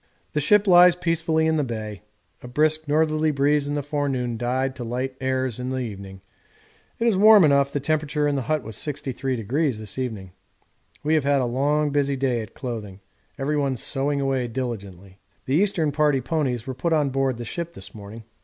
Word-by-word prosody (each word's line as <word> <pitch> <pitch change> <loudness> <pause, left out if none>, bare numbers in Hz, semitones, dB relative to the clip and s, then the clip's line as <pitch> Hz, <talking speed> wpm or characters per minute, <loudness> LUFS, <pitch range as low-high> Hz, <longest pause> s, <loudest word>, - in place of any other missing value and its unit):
The 150 - +1
ship 205 +8 +4
lies 180 -2 +7
peacefully 165 -2 0
in 160 0 +2
the 150 - +1
bay; 110 -5 -5 0.4
a - - -9
brisk 155 +4 +1
northerly 155 +1 +2
breeze 145 0 +2
in 145 - -2
the 145 - -2
forenoon 135 -5 -2
died 130 +3 -1
to 125 - -5
light 125 +3 -3
airs 130 -2 -1
in 125 0 -3
the 130 - -2
evening 100 -6 -6 0.8
it 230 - -1
is 230 -4 +3
warm 210 -1 +7
enough, 140 -1 +3
the 145 - -1
temperature 150 0 0
in 145 - 0
the 135 - -1
hut 155 +2 -1
was 110 -1 -7
63° 135 -2 -2
this 110 +3 -6
evening. 110 -8 -4 0.7
We 155 +2 +1
have 155 -3 +3
had 140 0 +2
a - - 0
long 145 +4 +1
busy 140 -1 +1
day 130 -3 0
at 110 - -10
clothing 110 -7 -6 0.4
everyone 140 -1 -1
sewing 140 +3 -1
away 135 -2 0
diligently. 100 -6 -6 0.3
The 130 - -2
Eastern 170 -3 +2
Party 145 -2 +2
ponies 130 -3 -2
were 130 - -4
put 160 +7 -1
on 150 -3 +2
board 135 -2 0
the 120 - -6
ship 170 +7 -5
this - - -9
morning. 110 +2 -10
135 Hz, 190 wpm, -24 LUFS, 120-150 Hz, 0.8 s, lies